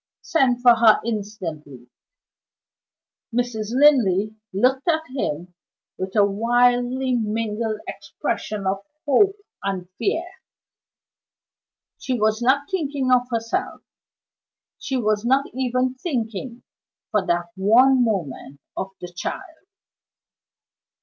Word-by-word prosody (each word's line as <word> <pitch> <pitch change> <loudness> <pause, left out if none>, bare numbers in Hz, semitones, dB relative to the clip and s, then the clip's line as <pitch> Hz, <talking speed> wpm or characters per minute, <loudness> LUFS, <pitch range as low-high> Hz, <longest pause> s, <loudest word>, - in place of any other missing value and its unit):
"Send 250 -6 +1
for 240 -2 +7
her 225 -2 +6
instantly!" 165 - -5 1.4
Mrs. 235 -3 -2
Linley 220 -7 +4 0.2
looked 255 - +1
at 320 -2 +2
him 175 - -3 0.4
with 190 +2 -5
a 205 -2 +5
wildly 245 +4 +2
mingled 220 -1 -2
expression 210 -2 -4
of 190 +1 0 0.3
hope 385 +8 +4 0.3
and 190 -2 -3
fear. 350 -4 0 1.7
She 255 -3 -2
was 215 +1 +1
not 270 +4 +2
thinking 285 -7 -1
of 250 0 +3
herself 230 -1 -2 1.0
she 265 - -2
was 215 -3 0
not 265 +3 +2
even 255 0 0
thinking, 245 - -4 0.5
for 210 -3 +2
that 175 -1 -1
one 245 +7 +5
moment, 150 - -3 0.2
of 190 - -3
the 180 - -5
child. 325 - -6
235 Hz, 105 wpm, -22 LUFS, 205-260 Hz, 1.7 s, for